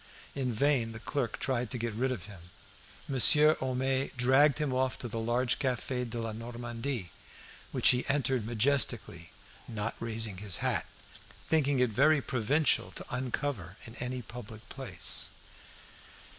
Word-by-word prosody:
In 130 -3 -2
vain 120 -1 +1
the 110 - -8
clerk 125 -2 -2
tried 125 -3 -1
to 130 - -3
get 115 -1 -3
rid 130 +4 0
of 125 - -4
him. 95 -4 -13 0.6
Monsieur 150 +3 +6
Homais 130 +1 0
dragged 130 +4 +4
him 150 -4 -1
off 130 0 0
to 120 - -5
the 115 0 -4
large 120 +2 +1
Cafe 125 -1 -1
de 120 0 -5
la 115 -1 -3
Normandie, 120 - -5 0.6
which - - +5
he 125 0 +3
entered 135 -4 +1
majestically, 115 - +1 0.4
not 110 0 -3
raising 110 -3 -2
his 100 -3 -1
hat, - - +1 0.6
thinking 145 -3 +2
it 125 -2 +2
very 145 +7 +4
provincial 135 +4 +1
to - - -5
uncover 125 - -3
in 115 - -9
any 125 0 -3
public 110 -1 -10
place. 115 -10 0
125 Hz, 145 wpm, -30 LUFS, 115-135 Hz, 0.6 s, Monsieur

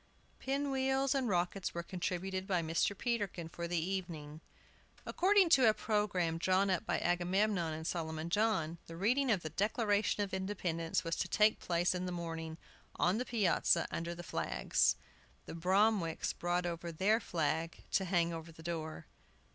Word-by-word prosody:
Pin 275 +1 -1
wheels 265 0 +1
and 265 -4 0
rockets 180 0 -1
were 170 - -2
contributed 185 +1 -3
by 180 -4 +1
Mr. 165 +5 0
Peterkin 205 -9 -2
for 170 +1 -5
the 175 0 -1
evening. 165 -4 -4 0.6
According 385 -1 +4
to 260 -8 +6
a 215 - +2
programme 205 -6 0
drawn 190 +2 +2
up 180 - -1
by - - +1
Agamemnon 175 0 +1
and 160 +1 -5
Solomon 160 -1 -3
John, 190 -6 +1
the 165 - -8
reading 250 +8 +2
of 200 -6 +2
the 155 - -5
Declaration 205 +2 +1
of 195 - -6
Independence 180 -4 -1
was 165 0 -1
to - - -1
take 215 0 +3
place 175 0 +1
in 180 0 -3
the - - -3
morning, 165 -2 -5 0.4
on 180 +6 +2
the 250 - -2
piazza, 210 -8 +2
under 170 +1 -3
the 175 - -8
flags. 60 - +1 0.5
The - - -7
Bromwicks 185 0 +1
brought 175 +1 -1
over 170 0 -4
their 195 +7 +2
flag 165 -4 -2
to 190 - +2
hang 170 -2 +1
over 165 0 -7
the 160 0 -14
door. 160 -2 -4
180 Hz, 165 wpm, -34 LUFS, 165-210 Hz, 0.6 s, to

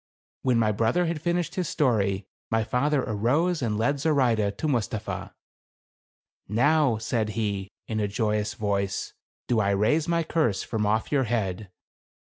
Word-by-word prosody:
When 125 -3 +2
my 110 -2 +3
brother 115 - +1
had 165 -2 -2
finished 175 0 0
his 180 -3 -2
story, 100 -8 +1 0.2
my 110 0 +1
father 140 +4 +1
arose 140 - +1
and 110 -4 0
led 140 +6 +1
Zoraide 120 -9 +2
to 155 - -2
Mustapha. 115 -5 -2 0.6
" - - -72
Now," 130 +3 +3
said 110 0 -1
he, 100 -3 -2 0.2
in 110 -1 -2
a 105 - +1
joyous 105 0 -1
voice, 100 -2 -2 0.3
"do 120 -3 +2
I 100 -2 +2
raise 110 +11 +2
my 170 0 +1
curse 155 - 0
from 110 -3 -1
off 110 +1 0
your 135 -3 +2
head. 105 -4 -2
115 Hz, 155 wpm, -26 LUFS, 105-145 Hz, 0.6 s, my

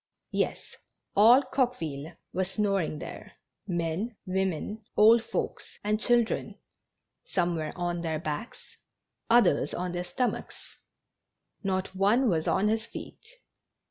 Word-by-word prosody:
Yes, - - -2 0.4
all 235 +7 +7
Coqueville 165 - -2 0.2
was 185 +1 -1
snoring 195 -6 0
there - - -9 0.2
— - - -57
men, 175 +5 -2
women, 190 +3 -2
old 225 +2 +7
folks - - -4
and 210 +1 +1
children. 235 0 +2 0.7
Some 175 -2 0
were 155 -1 -3
on 175 -1 -2
their 160 -2 -1
backs, 155 +8 -6 0.5
others 240 +1 +4
on 180 0 -2
their 175 0 -3
stomachs; 245 +8 -4 0.8
not 190 -2 -1
one 210 +7 +3
was 160 -4 0
on 205 - +2
his 220 +1 +1
feet. - - -9
190 Hz, 120 wpm, -28 LUFS, 170-225 Hz, 0.8 s, all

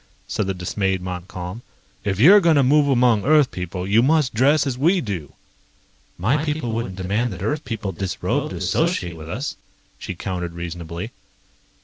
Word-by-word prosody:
said 105 - -2
the 95 - 0
dismayed 95 +1 -1
Montcalm. 90 +2 -6 0.4
"If 100 -2 -1
you're 185 - +8
going 170 -4 +4
to 140 - +4
move 145 +2 +4
among 120 -5 +3
Earth 150 -2 +4
people, 90 0 -5
you 105 +3 +4
must 145 0 +2
dress 140 +7 +3
as 135 -3 -1
we 170 +9 +3
do." 100 - -5 0.8
"My 125 +12 +1
people 150 -6 -2
wouldn't 110 -4 -3
demand 100 +6 -1
that 90 +1 -7
Earth 150 +8 -1
people 110 -4 -3
disrobe 95 +1 -2
to - - -6
associate 85 -1 0
with 80 0 -10
us," 125 +11 -4 0.4
she 95 - -6
countered 90 -1 -4
reasonably. 85 +4 -6
105 Hz, 165 wpm, -22 LUFS, 90-135 Hz, 0.8 s, you're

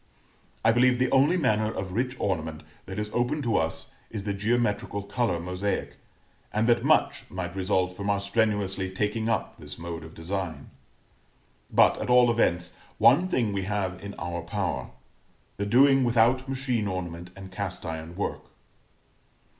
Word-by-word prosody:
I 115 - +7
believe 125 +1 +4
the 130 0 +1
only 140 +7 +4
manner 110 -8 +1
of 95 -3 -5
rich 125 +6 -1
ornament 80 -5 -2 0.2
that 95 - -6
is 105 0 -3
open 125 +5 0
to 115 -4 +1
us 80 0 -2 0.2
is 105 -3 -5
the 100 -1 -2
geometrical 105 -1 0
color 100 -4 -1
mosaic, 90 +3 -3 0.5
and 110 +1 +1
that 120 -1 +3
much - - +2
might 90 -1 -5
result 95 -1 0
from 100 +2 -3
our 100 -1 +2
strenuously 100 -2 0
taking 105 +4 -1
up 110 - -2
this - - -9
mode 85 -1 -6
of 80 0 -12
design. 90 0 -4 1.0
But, - - +4
at - - -3
all 125 -1 +6
events, 90 -7 +1 0.2
one 140 +10 +5
thing 115 - 0
we 95 -1 -2
have 95 -2 -2
in 100 0 -7
our 85 0 -4
power 95 +2 -3 0.7
the 100 - -2
doing 135 +4 +5
without 120 +2 +3
machine 130 -5 -1
ornament 90 -2 -5
and 95 -1 -10
cast 95 -1 -4
iron 80 0 -5
work. 100 - -3
100 Hz, 160 wpm, -27 LUFS, 90-120 Hz, 1.0 s, I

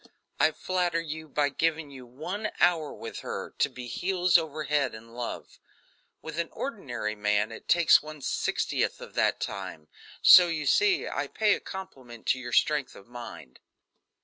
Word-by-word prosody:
I - - +5
flatter 175 0 -1
you 160 -1 -6
by 145 0 +1
giving 155 +1 -1
you 130 -2 -11
one 180 - -4
hour 160 -4 +3
with - - -7
her - - -6
to - - +3
be 125 - -9
heels 180 +7 0
over 155 -2 +2
head 145 -5 0
in 115 +1 -13
love. 120 0 -6 0.6
With 160 +1 -5
an 170 - -1
ordinary 125 - -4
man 105 0 0
it 115 - -10
takes 170 -1 +6
one 155 -1 -10
sixtieth - - -1
of - - -10
that - - +1
time; 90 -6 -6 0.3
so 180 0 +10
you 160 -3 -2
see 390 - +3
I - - -2
pay 215 -2 +2
a - - -2
compliment 130 - -9
to 130 - +3
your 120 -1 -7
strength 145 +1 +2
of 100 - -14
mind." 120 - -10
150 Hz, 170 wpm, -28 LUFS, 120-170 Hz, 0.6 s, so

